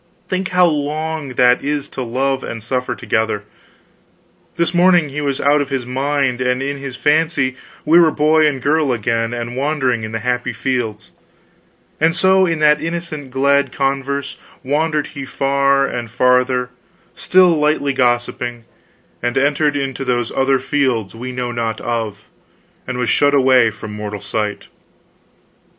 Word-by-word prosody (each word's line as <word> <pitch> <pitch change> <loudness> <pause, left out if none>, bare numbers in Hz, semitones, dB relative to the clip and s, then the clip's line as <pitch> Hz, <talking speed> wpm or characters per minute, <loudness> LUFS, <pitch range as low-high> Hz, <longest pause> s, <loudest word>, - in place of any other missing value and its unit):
Think 185 0 -1
how 180 0 +3
long 155 -2 -2
that 125 0 +4
is 145 -1 -2
to 135 - -6
love 135 +3 -1
and 115 -2 -6
suffer 125 +1 -2
together. 110 -1 -1 1.1
This 170 +1 0
morning 175 -1 +4 0.2
was 140 -2 -1
he - - -4
out 145 +1 +4
of 140 - -4
his 135 -3 -2
mind, 135 0 -1
and 125 0 +1
in 140 0 -3
his 135 -2 -6
fancy 150 -2 +1 0.3
we 165 +3 +6
were 165 -2 +6
boy 155 +1 +3
and 135 -4 -2
girl 150 -1 +2
again 115 0 -1
and 120 0 -5
wandering 135 -4 0
in 110 - -5
the 110 -1 -4
happy 125 0 -1
fields; 120 -5 -3 0.9
and 165 +1 +2
so 190 +1 +4
in 165 -1 0
that 150 0 +4
innocent 165 -4 -5
glad 140 0 +2
converse 140 0 -2 0.3
wandered 150 +2 0
he 140 -2 -6
far 140 +1 +1
and 120 -4 -4
farther, 125 +1 +2 0.4
still 185 0 +4
lightly 150 -3 +1
gossiping, 120 -2 -1 0.6
and 120 +2 -1
entered 145 +2 +2
into 135 -1 -3
those 120 -3 -1
other 135 0 +2
fields 130 -6 -1
we 125 +3 -6
know 125 -1 -3
not 115 -2 -3
of, 115 -3 -4 0.6
and 125 0 -3
was 125 -1 -1
shut 145 0 +3
away 130 -4 +5
from 105 0 -9
mortal 105 -1 -5
sight. 105 0 -3
135 Hz, 155 wpm, -18 LUFS, 125-150 Hz, 1.1 s, we